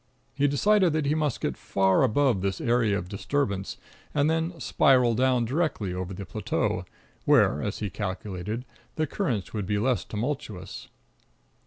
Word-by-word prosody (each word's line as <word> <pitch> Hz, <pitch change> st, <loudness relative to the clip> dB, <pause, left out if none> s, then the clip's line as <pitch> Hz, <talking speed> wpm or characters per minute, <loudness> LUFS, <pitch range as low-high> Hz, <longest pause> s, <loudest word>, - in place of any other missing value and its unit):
He 145 Hz, 0 st, +2 dB
decided 185 Hz, +5 st, +3 dB
that 155 Hz, -2 st, 0 dB
he 145 Hz, -, +2 dB
must 150 Hz, -5 st, -1 dB
get -, -, -1 dB
far 95 Hz, -1 st, +2 dB
above 130 Hz, -4 st, +2 dB
this 95 Hz, -1 st, -1 dB
area 115 Hz, -4 st, +2 dB
of 90 Hz, -1 st, -5 dB
disturbance, 100 Hz, -1 st, -2 dB, 0.4 s
and 150 Hz, +2 st, +3 dB
then 165 Hz, +1 st, -1 dB
spiral 125 Hz, -6 st, +4 dB
down 125 Hz, 0 st, +2 dB
directly 130 Hz, -, -1 dB
over 90 Hz, +1 st, -4 dB
the 95 Hz, +1 st, -6 dB
plateau, 80 Hz, -, -2 dB, 0.4 s
where, -, -, +4 dB
as -, -, -3 dB
he 105 Hz, -3 st, -4 dB
calculated, 100 Hz, +3 st, -4 dB, 0.3 s
the 155 Hz, -, +1 dB
currents 125 Hz, -, -2 dB
would 105 Hz, -4 st, -3 dB
be 105 Hz, -, +1 dB
less 125 Hz, +3 st, +1 dB
tumultuous. 110 Hz, -5 st, -5 dB
120 Hz, 155 wpm, -27 LUFS, 100-145 Hz, 0.4 s, spiral